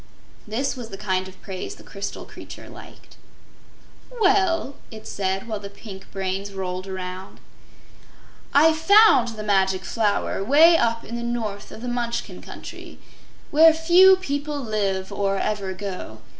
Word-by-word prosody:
This 255 +7 -1
was 240 -3 -8
the 195 - -8
kind 190 -2 -1
of 190 0 -14
praise 190 -2 -6
the - - -15
crystal 200 0 -6
creature - - -11
liked. - - -14 0.9
"Well," 385 - +2 0.2
it 220 -1 -11
said, 195 +1 -2
while 215 -2 -3
the 200 0 -8
pink 200 -1 -11
brains 195 +1 -3
rolled 185 0 -4
around, 185 0 -7 1.1
"I 315 +3 +6
found 320 - +5
the 215 - -6
Magic 190 -2 +1
Flower 210 -3 0
way 310 +9 +6
up 230 -6 +1
in 235 - -5
the - - -4
north 230 -4 -4
of 225 - -10
the - - -4
Munchkin 240 -1 -3
Country - - -10 0.5
where 320 +2 +8
few 350 +4 +7
people 290 -5 -3
live 200 -6 -2
or 195 -1 -1
ever 200 -2 -2
go. 185 - -7
215 Hz, 145 wpm, -23 LUFS, 195-285 Hz, 1.1 s, where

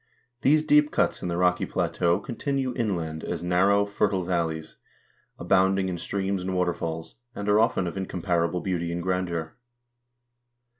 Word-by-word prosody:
These 150 +3 +4
deep 150 -1 +4
cuts - - 0
in - - -3
the 85 -1 -2
rocky 90 0 +2
plateau 85 0 +1
continue 135 0 -2
inland 85 -9 -2
as - - -4
narrow, 95 +3 +3
fertile 100 -2 0
valleys, 80 -3 -2 0.6
abounding 95 0 +2
in 90 - -3
streams 95 +1 -2
and 95 0 -3
waterfalls, 85 -2 -2 0.2
and 100 - -5
are 105 +1 +4
often 115 -4 +2
of 85 - -4
incomparable 90 -2 -1
beauty 85 -3 -2
and 85 0 -3
grandeur. 85 -3 -2
90 Hz, 145 wpm, -26 LUFS, 85-100 Hz, 0.6 s, These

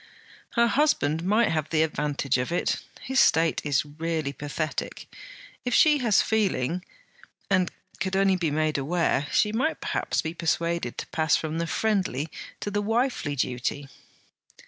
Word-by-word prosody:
'Her 235 -1 +4
husband 170 - +2
might 215 +5 +3
have 155 -1 -1
the 160 -1 +3
advantage 145 -4 -1
of 125 +5 -2
it. 175 - 0 0.2
His 265 0 0
state 165 0 +4
is 145 -1 +1
really 155 -1 -3
pathetic. 150 +3 -4 0.6
If 245 -2 0
she 300 -2 +5
has 230 -6 +3
feeling, 185 - 0 0.7
and 185 -2 +3 0.3
could 190 +1 -1
only 195 0 +4
be 170 -3 0
made 155 0 0
aware, 150 -1 0
she 210 - +3
might 255 +9 0
perhaps - - -1
be 160 0 -3
persuaded 170 -5 -1
to - - -5
pass 155 -1 +2
from 160 +1 -2
the 170 - -1
friendly 185 - 0 0.3
to 205 - -3
the 205 0 0
wifely 225 - 0
duty.' 130 +2 -2
165 Hz, 150 wpm, -26 LUFS, 150-205 Hz, 0.7 s, she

